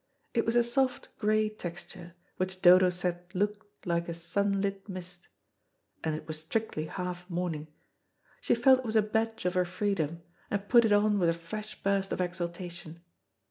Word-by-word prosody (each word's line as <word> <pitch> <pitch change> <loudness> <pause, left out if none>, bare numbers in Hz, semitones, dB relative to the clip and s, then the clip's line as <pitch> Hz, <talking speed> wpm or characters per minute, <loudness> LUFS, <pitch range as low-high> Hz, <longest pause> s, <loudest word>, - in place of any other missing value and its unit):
It 230 - +1
was 230 - +1
a 240 - +6
soft 255 +2 0
grey 215 0 +3
texture, 175 -3 -7 0.2
which 185 0 -3
Dodo 180 0 +8
said 175 0 -1
looked 205 +2 -3
like 170 -1 0
a 170 - -3
sunlit 195 +3 -1
mist, 180 -1 -8 0.8
and 160 -1 0
it 155 0 -8
was 155 -1 -4
strictly 160 -1 -2
half 180 +1 -5
mourning. 170 -3 -2 0.7
She - - +3
felt 255 +2 +6
it - - -5
was 220 -1 -2
a 215 - +6
badge 220 0 -1
of 180 - +1
her 180 -1 +3
freedom, 175 -3 -2 0.3
and 200 0 -2
put 235 0 +6
it 220 - +2
on 205 0 +4
with 175 -2 +3
a - - +3
fresh 215 +6 -6
burst 195 -1 +1
of - - -2
exultation. 175 -2 -4
185 Hz, 175 wpm, -30 LUFS, 175-210 Hz, 0.8 s, Dodo